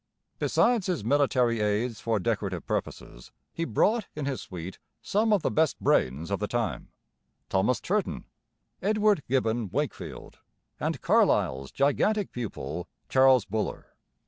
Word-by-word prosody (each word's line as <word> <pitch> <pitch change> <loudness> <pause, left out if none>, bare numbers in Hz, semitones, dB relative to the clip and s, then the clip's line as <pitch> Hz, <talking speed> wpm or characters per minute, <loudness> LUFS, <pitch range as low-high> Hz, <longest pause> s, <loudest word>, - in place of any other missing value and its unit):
Besides 230 -5 +2
his 175 - -1
military 125 -3 +2
aides 105 +2 0
for 115 -1 0
decorative 100 -4 -2
purposes, - - -5 0.2
he 165 - -2
brought 215 - +1
in 150 -2 -3
his 135 -2 -2
suite 90 0 -8 0.2
some 215 +2 +1
of 205 -5 +3
the - - +1
best 160 -2 +1
brains 75 +9 +1
of 100 - 0
the 105 - -1
time, 120 +1 -2 0.6
Thomas 100 +6 +2
Turton, 205 +2 -2 0.6
Edward 210 -2 +2
Gibbon 115 -4 0
Wakefield, - - -5 0.4
and - - -2
Carlyle's 65 +1 +2
gigantic 190 +9 +1
pupil, 90 -8 -5 0.2
Charles 130 -3 +5
Buller. 110 +1 -4
120 Hz, 130 wpm, -27 LUFS, 105-165 Hz, 0.6 s, Charles